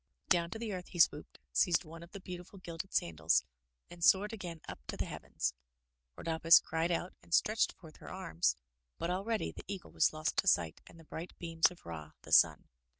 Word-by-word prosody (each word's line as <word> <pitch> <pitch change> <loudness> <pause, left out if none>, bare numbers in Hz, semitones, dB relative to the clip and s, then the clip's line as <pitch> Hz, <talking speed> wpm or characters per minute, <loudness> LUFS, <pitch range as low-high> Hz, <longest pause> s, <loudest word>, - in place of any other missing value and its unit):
Down 170 -1 +3
to 200 - -5
the 220 -2 -4
earth 180 -1 -5
he 175 - -8
swooped, 150 -2 +3
seized 175 -1 +3
one 165 +1 -10
of 170 +1 -12
the 200 - -8
beautiful 180 +1 -9
gilded 175 +1 -7
sandals, 80 -1 +2 0.4
and 175 -1 -9
soared 205 +5 +5
again 175 -6 -6
up - - -7
to - - -5
the - - -1
heavens. - - -3 0.6
Rhodopis 165 0 +6
cried 165 +1 -1
out 175 +1 -1
and 170 - 0
stretched 215 +1 +2
forth 160 -4 -15
her - - -11
arms, 185 -2 0 0.4
but 170 - -2
already 205 +4 -1
the - - -10
eagle 195 -2 -6
was - - +3
lost 155 0 -2
to 195 - +2
sight 85 - +2
in - - -15
the 165 - -14
bright 160 +2 -8
beams 165 -1 +2
of 180 - -15
Ra, 80 -2 -7
the - - -11
Sun. - - +5
170 Hz, 205 wpm, -34 LUFS, 165-185 Hz, 0.6 s, Rhodopis